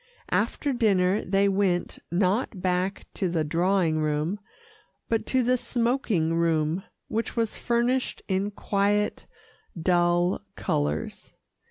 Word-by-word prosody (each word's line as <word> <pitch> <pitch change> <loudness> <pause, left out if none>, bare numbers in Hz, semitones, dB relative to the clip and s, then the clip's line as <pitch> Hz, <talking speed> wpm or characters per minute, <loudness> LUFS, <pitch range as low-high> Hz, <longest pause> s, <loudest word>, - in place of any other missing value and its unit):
After 285 -2 0
dinner 200 -5 +2
they 195 +2 +2
went, 190 -3 0
not 190 +4 +1
back 185 +1 -1
to 190 - -1
the 165 -2 0
drawing 170 +1 +1
room, 155 +6 -1 0.7
but 225 -1 0
to 260 -1 +2
the 250 +1 +3
smoking 230 -10 0
room, 165 0 +1 0.3
which 225 0 -2
was 230 -2 -1
furnished 245 +2 0
in 195 +1 0
quiet, 205 0 0 0.5
dull 175 +1 +2
colours. 75 +1 -2
190 Hz, 115 wpm, -26 LUFS, 175-215 Hz, 0.7 s, the